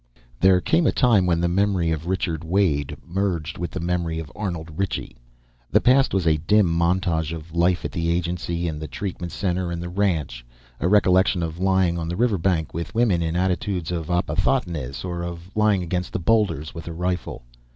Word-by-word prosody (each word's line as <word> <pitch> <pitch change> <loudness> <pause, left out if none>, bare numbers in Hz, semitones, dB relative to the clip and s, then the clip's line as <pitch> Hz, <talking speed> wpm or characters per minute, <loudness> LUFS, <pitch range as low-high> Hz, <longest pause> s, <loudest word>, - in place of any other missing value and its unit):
There 95 -1 +5
came 170 - +2
a - - +4
time 110 -8 +3
when 85 -1 +2
the 85 - +2
memory 95 -2 +1
of 80 +1 -3
Richard 85 -4 -1
Wade 80 -5 0
merged 85 -4 -2
with 85 -1 -2
the - - -5
memory 85 -1 -1
of 80 -2 -6
Arnold 85 -6 -4
Ritchie. 95 -1 -2 0.5
The - - +4
past 130 +2 +4
was 95 -3 0
a 80 -2 +3
dim 105 +7 +3
montage 85 -1 +1
of 80 0 -8
life 85 +2 +2
at - - -2
the 85 -1 -1
agency 85 0 -1
and 75 -2 -4
the 75 - -4
treatment 90 +1 -5
center 90 -2 -1
and 85 - -3
the 85 0 -5
ranch, 80 -11 -1 0.4
a - - 0
recollection 95 -2 +4
of 80 +1 -4
lying 95 -2 +2
on 80 - -3
the 85 - -2
river 115 -5 +2
bank 80 -2 0
with 85 +5 -5
women 110 -7 +3
in 80 0 -1
attitudes 90 -1 -1
of 85 -3 -3
opisthotonos 85 - -1
or 85 -1 -3
of 85 +1 -7
lying 105 -3 +3
against 90 +1 -3
the - - -1
boulders 95 -6 +1
with 85 -1 -8
a 85 - -4
rifle. 90 -5 -3
85 Hz, 195 wpm, -23 LUFS, 80-95 Hz, 0.5 s, There